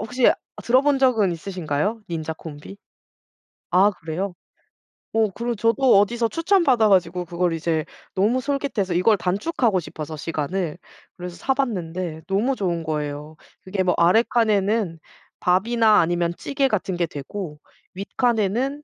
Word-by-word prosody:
혹시 245 Hz, +3 st, +3 dB, 0.3 s
들어본 270 Hz, +3 st, +3 dB
적은 225 Hz, -9 st, +3 dB
있으신가요? 180 Hz, +3 st, -2 dB
Ninja 160 Hz, -2 st, -4 dB
Combi? 155 Hz, +4 st, -9 dB, 0.9 s
아 190 Hz, +4 st, +5 dB
그래요? 180 Hz, +2 st, -4 dB, 0.8 s
어 225 Hz, -1 st, +3 dB
그리고 235 Hz, +3 st, -3 dB
저도 230 Hz, +1 st, +4 dB
어디서 230 Hz, +3 st, +1 dB
추천받아 330 Hz, -, +3 dB
가지고 180 Hz, -2 st, +2 dB
그걸 175 Hz, 0 st, -1 dB
이제 160 Hz, -1 st, -1 dB, 0.3 s
너무 215 Hz, +7 st, +2 dB
솔깃해서 265 Hz, -8 st, -1 dB
이걸 195 Hz, +5 st, +3 dB
단축하고 205 Hz, -, 0 dB
싶어서 155 Hz, 0 st, -7 dB
시간을 165 Hz, +2 st, -3 dB, 0.4 s
그래서 180 Hz, 0 st, -7 dB
사봤는데 185 Hz, -, -2 dB
너무 215 Hz, +8 st, +1 dB
좋은 175 Hz, -6 st, -2 dB
거예요. 150 Hz, 0 st, -4 dB, 0.3 s
그게 190 Hz, 0 st, -2 dB
뭐 180 Hz, -1 st, +2 dB
아래 180 Hz, +7 st, +5 dB
칸에는 210 Hz, -5 st, +1 dB, 0.4 s
밥이나 215 Hz, +4 st, +4 dB
아니면 170 Hz, 0 st, +1 dB
찌개 275 Hz, -1 st, 0 dB
같은 190 Hz, -4 st, -1 dB
게 175 Hz, -, +1 dB
되고 150 Hz, +1 st, -7 dB, 0.3 s
윗칸에는 235 Hz, +7 st, -1 dB
195 Hz, 330 characters per minute, -23 LUFS, 170-235 Hz, 0.9 s, 아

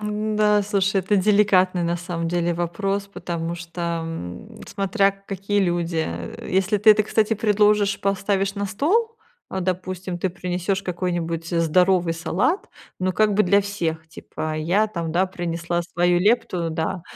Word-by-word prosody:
Н-да, 210 Hz, 0 st, +1 dB
слушай, 195 Hz, -1 st, +1 dB
это 190 Hz, +3 st, +1 dB
деликатный 190 Hz, -2 st, +3 dB
на 170 Hz, 0 st, 0 dB
самом 170 Hz, -1 st, -4 dB
деле 175 Hz, 0 st, 0 dB
вопрос, 195 Hz, +4 st, -2 dB
потому 170 Hz, -3 st, -4 dB
что, 170 Hz, 0 st, -8 dB, 0.2 s
м, 90 Hz, -, -7 dB, 0.2 s
смотря 195 Hz, 0 st, +1 dB
какие 195 Hz, +1 st, -3 dB
люди, 175 Hz, -3 st, 0 dB
э, 85 Hz, 0 st, -7 dB
если 190 Hz, +3 st, +2 dB
ты 210 Hz, +2 st, +6 dB
это, 215 Hz, 0 st, +5 dB
кстати, 215 Hz, +1 st, +1 dB
предложишь, 210 Hz, -1 st, +2 dB
поставишь 195 Hz, 0 st, 0 dB
на 200 Hz, 0 st, -2 dB
стол, 390 Hz, -, 0 dB, 0.3 s
а, 190 Hz, -, -3 dB
допустим, 185 Hz, 0 st, -3 dB
ты 190 Hz, -, 0 dB
принесёшь 180 Hz, +2 st, -2 dB
какой-нибудь 175 Hz, -3 st, -3 dB
здоровый 175 Hz, +1 st, +2 dB
салат, 175 Hz, -, -1 dB, 0.3 s
ну, 185 Hz, 0 st, +1 dB
как 215 Hz, +2 st, +2 dB
бы 210 Hz, +1 st, +3 dB
для 200 Hz, +2 st, +4 dB
всех, 165 Hz, -5 st, -3 dB
типа: 155 Hz, 0 st, -6 dB
"Я 180 Hz, +8 st, +2 dB
там, 170 Hz, -5 st, -4 dB
да, 180 Hz, +3 st, +3 dB
принесла 175 Hz, -1 st, -3 dB
свою 175 Hz, +1 st, +1 dB
лепту", 180 Hz, -4 st, +1 dB
да, 165 Hz, +3 st, -3 dB
185 Hz, 150 wpm, -23 LUFS, 170-200 Hz, 0.3 s, ты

